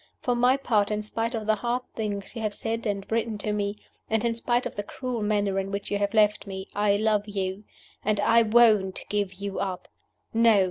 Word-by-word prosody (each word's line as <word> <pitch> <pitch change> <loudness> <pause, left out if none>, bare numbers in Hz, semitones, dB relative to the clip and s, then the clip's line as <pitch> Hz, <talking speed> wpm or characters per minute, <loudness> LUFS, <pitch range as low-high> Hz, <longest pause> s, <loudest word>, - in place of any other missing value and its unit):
For 245 - 0
my 250 +2 +4
part, 215 -7 +1
in 210 0 -1
spite 225 +3 -2
of 220 -1 -3
the 215 - +3
hard 240 +4 -1
things 205 -3 -4
you 230 - -4
have 210 -2 -2
said 225 0 -3
and 200 -1 -2
written 225 -1 0
to 210 +1 -2
me, 205 0 -1 0.3
and 220 +1 +1
in 235 - +2
spite 240 +1 0
of - - -5
the 205 - -2
cruel 245 +2 -4
manner 205 -2 +1
in 195 0 -3
which 200 0 -4
you 205 - +1
have 205 +2 -1
left 210 -1 +3
me, 190 0 -6
I 205 0 +2
love 215 -1 +1
you 195 0 -3 0.4
and 210 0 +1
I 230 +3 +5
won't 215 -4 +4
give 200 -2 -1
you 200 +1 -4
up. 185 -2 -3 0.5
No! 225 -2 +5
210 Hz, 220 wpm, -26 LUFS, 200-230 Hz, 0.5 s, I